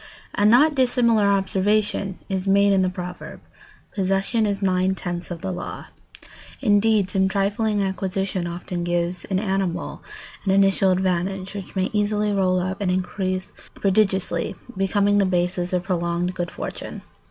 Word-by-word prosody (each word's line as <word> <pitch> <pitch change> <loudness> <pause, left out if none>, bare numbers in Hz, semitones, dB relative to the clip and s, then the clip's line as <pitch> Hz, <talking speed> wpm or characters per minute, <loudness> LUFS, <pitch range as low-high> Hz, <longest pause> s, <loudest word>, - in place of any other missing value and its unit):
A 205 - +3
not 275 +8 +6
dissimilar 240 -5 +3
observation 200 0 +1
is 190 -1 -2
made 200 +1 +4
in 190 - +3
the 185 - +2
proverb: 180 -1 -7 0.5
"Possession 195 +3 +1
is 200 -1 -1
nine 185 -1 +1
tenths 175 -1 -5
of 170 -2 -6
the 190 -1 -3
law." - - -7 0.7
Indeed, 210 -3 +3
some 190 -2 +2
trifling 205 +1 0
acquisition 190 -1 -2
often 175 0 -4
gives 175 0 -1
an 190 - -1
animal 190 -3 -2 0.4
an 195 - -2
initial 195 0 +4
advantage 185 +1 0
which 200 -2 -8
may 190 0 0
easily 210 0 +1
roll 185 -2 +2
up 190 +3 -3
and 195 - 0
increase 185 0 -2 0.2
prodigiously, 190 -4 +1 0.2
becoming 200 +1 +2
the 200 - +3
basis 180 0 0
of 180 -1 0
prolonged 175 -1 -1
good 175 -2 -3
fortune. - - -7
190 Hz, 145 wpm, -23 LUFS, 185-205 Hz, 0.7 s, not